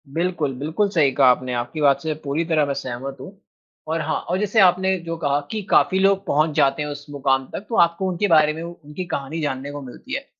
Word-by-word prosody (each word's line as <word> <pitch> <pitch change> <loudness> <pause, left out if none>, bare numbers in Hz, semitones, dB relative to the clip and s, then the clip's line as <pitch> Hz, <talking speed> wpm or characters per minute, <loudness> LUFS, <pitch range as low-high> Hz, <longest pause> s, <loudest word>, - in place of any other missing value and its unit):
बिल्कुल, 165 -2 -1
बिल्कुल 160 +8 0
सही 155 -8 +3
कहा 135 0 +4
आपने, 125 0 +1
आपकी 120 +6 -3
बात 140 -2 +4
से 160 -1 -2
पूरी 145 +4 -1
तरह 160 -3 +2
मैं 140 - -2
सहमत 135 +1 -5
हूँ। 195 +7 -11 0.5
और 165 0 0
हाँ 155 0 -1
और 180 - +1
जैसे 210 +2 +1
आपने 190 +1 +4
जो 165 0 -3
कहा 145 -3 0
कि 215 - -2
काफ़ी 190 - +4
लोग 195 0 +2
पहुँच 155 +2 +2
जाते 140 -1 +2
हैं 150 - -3
उस 145 0 -7
मुकाम 135 -2 0
तक 200 - -6
तो 230 - -2
आपको 170 +3 +1
उनके 185 +3 0
बारे 155 -3 +4
में 160 - -7
उ 170 - -6
उनकी 150 +5 -6
कहानी 155 -1 -4
जानने 140 -1 -3
को 145 0 -7
मिलती 130 -2 -10
है। - - -5
155 Hz, 235 wpm, -22 LUFS, 140-180 Hz, 0.5 s, कहा